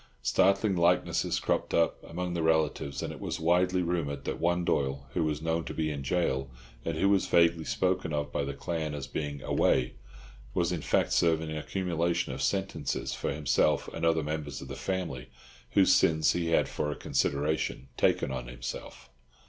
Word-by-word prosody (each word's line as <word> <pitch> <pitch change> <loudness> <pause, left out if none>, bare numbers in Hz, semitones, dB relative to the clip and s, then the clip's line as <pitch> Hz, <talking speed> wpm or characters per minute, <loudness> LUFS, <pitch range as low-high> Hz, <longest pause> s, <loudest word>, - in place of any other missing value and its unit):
Startling 100 +1 +3
likenesses 85 +1 +2
cropped - - 0
up 85 - +1
among 90 +1 -4
the 85 - -1
relatives, 80 -4 +1
and - - -4
it - - -10
was - - -4
widely 90 +2 +2
rumoured 75 -5 -2
that - - -3
one 85 +1 +1
Doyle 70 -2 0
who - - +1
was 75 0 -2
known 80 0 0
to - - -6
be 80 -1 0
in 70 -2 -4
jail, 65 -3 0 0.3
and 80 -1 -2
who 95 - +3
was 100 -1 +3
vaguely 85 -1 +3
spoken 90 -2 0
of 75 -1 -2
by - - -1
the 70 0 -4
clan 80 0 -3
as 70 -2 -5
being 70 -3 -4
"away," - - +2 0.6
was 85 0 +1
in 85 -3 -2
fact - - +1
serving 80 -2 +2
an 80 - -3
accumulation 85 0 -1
of - - -5
sentences 95 0 -1
for - - -2
himself 75 0 +1
and 85 - -5
other 80 -1 +3
members 75 -2 -4
of 65 - -9
the 65 - -5
family, 65 -4 -3 0.4
whose 95 -2 +6
sins 80 -1 +4
he 85 -1 -1
had 85 - +3
for 75 - -2
a 75 - -3
consideration 70 -2 -1
taken - - +2
on 65 -2 -4
himself. - - -7
80 Hz, 185 wpm, -29 LUFS, 70-85 Hz, 0.6 s, whose